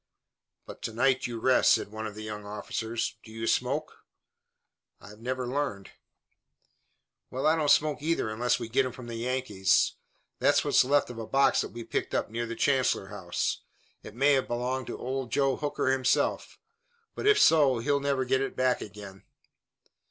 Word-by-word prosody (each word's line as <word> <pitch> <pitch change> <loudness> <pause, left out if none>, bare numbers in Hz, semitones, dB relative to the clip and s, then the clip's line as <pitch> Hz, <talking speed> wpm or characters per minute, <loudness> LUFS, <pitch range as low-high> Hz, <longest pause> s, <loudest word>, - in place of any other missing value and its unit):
"But - - -11
to 115 - -4
night 130 +3 +2
you 120 -1 -5
rest," 130 +2 +4
said - - -1
one 110 0 -5
of 105 - -9
the 110 - -7
young 105 -1 -6
officers. 110 +3 -4
"Do 110 - -14
you 115 0 -5
smoke?" - - -1 1.0
"I've 105 +1 -14
never 125 +2 -3
learned." 125 -7 -3 1.4
"Well, 130 - -4
I 155 - +5
don't 155 -3 0
smoke 150 0 +3
either 165 -5 0
unless 115 +3 0
we 115 - -5
get 120 +4 +2
'em 130 -2 -4
from 125 - -10
the 120 - -7
Yankees. 120 -6 +1 0.5
Here's - - +3
what's - - +4
left 140 0 +2
of 115 - -9
a 110 - -6
box 135 0 +3
that - - -5
we 120 0 -8
picked - - -3
up - - -1
near 120 +1 -3
the 115 - -5
Chancellor 130 -8 +1
House. 95 -4 -3 0.4
It 105 - -11
may 140 +4 +4
have 135 -1 +1
belonged 125 +1 -2
to - - -5
Old 130 -1 -4
Joe 135 0 +1
Hooker 145 -3 -1
himself, 130 -1 0 0.6
but - - -3
if 425 0 +5
so 145 - +5
he'll 140 +5 +1
never 140 -2 0
get 130 +1 +1
it 135 - -3
back 130 -1 +1
again." 100 -2 -10
125 Hz, 180 wpm, -28 LUFS, 110-135 Hz, 1.4 s, I